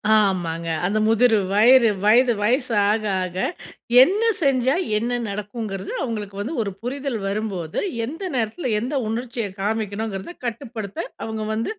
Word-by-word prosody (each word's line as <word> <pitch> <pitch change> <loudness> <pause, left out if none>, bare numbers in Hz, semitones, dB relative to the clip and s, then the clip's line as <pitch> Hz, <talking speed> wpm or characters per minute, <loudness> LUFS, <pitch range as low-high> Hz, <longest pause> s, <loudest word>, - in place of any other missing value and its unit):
ஆமாங்க. 175 -5 +1 0.2
அந்த 200 +4 0
முதிரு 225 0 +4 0.2
வயிறு 235 +2 +6
வயது 240 +4 +5
வயசு 245 +4 +1 0.2
ஆக 215 +1 +1 0.2
ஆக 185 0 -4 0.7
என்ன 400 +9 +1 0.2
செஞ்சா 265 -2 +3 0.2
என்ன 235 +3 -1 0.2
நடக்குங்கிறது, 205 -1 -5
அவங்களுக்கு 210 -5 -4
வந்து 250 +11 -4
ஒரு 200 -2 -2
புரிதல் 265 0 -3
வரும்போது, 195 -5 -3 0.3
எந்த 315 - -7
நேரத்தில 245 +5 -1
எந்த 255 +6 -3
உணர்ச்சிய 235 0 -3 0.2
காமிக்கணுங்கிறத 210 - -3
கட்டுப்படுத்த 225 -4 -5 0.3
அவங்க 220 -1 -4
வந்து, 225 - -2
220 Hz, 125 wpm, -22 LUFS, 205-250 Hz, 0.7 s, வயிறு